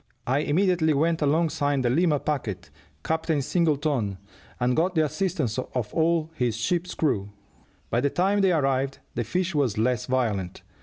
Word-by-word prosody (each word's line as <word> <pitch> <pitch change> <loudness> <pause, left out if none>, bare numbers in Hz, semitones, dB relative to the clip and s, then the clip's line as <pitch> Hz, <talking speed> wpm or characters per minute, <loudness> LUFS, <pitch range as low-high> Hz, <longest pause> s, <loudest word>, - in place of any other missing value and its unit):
I 130 +3 +1
immediately 160 0 +2
went 165 +3 +1
alongside 145 -2 +1
the 120 - +2
Lima 155 +1 +2
packet, 135 -11 -3 0.3
Captain 160 -1 0
Singleton, 145 - 0 0.4
and 125 0 +1
got 180 +3 +1
the 160 -1 +3
assistance 155 - -1
of 125 -3 -4
all 165 -1 +1
his 120 -6 -1
ship's 175 +9 -1
crew. 105 -10 0 0.6
By 120 - +2
the 140 - +2
time 195 +6 +1
they 190 -1 +4
arrived 135 -4 +1 0.2
the 120 - -1
fish 185 - -1
was 135 -8 +1
less 125 +2 0
violent. 110 -9 -1
145 Hz, 155 wpm, -25 LUFS, 125-165 Hz, 0.6 s, they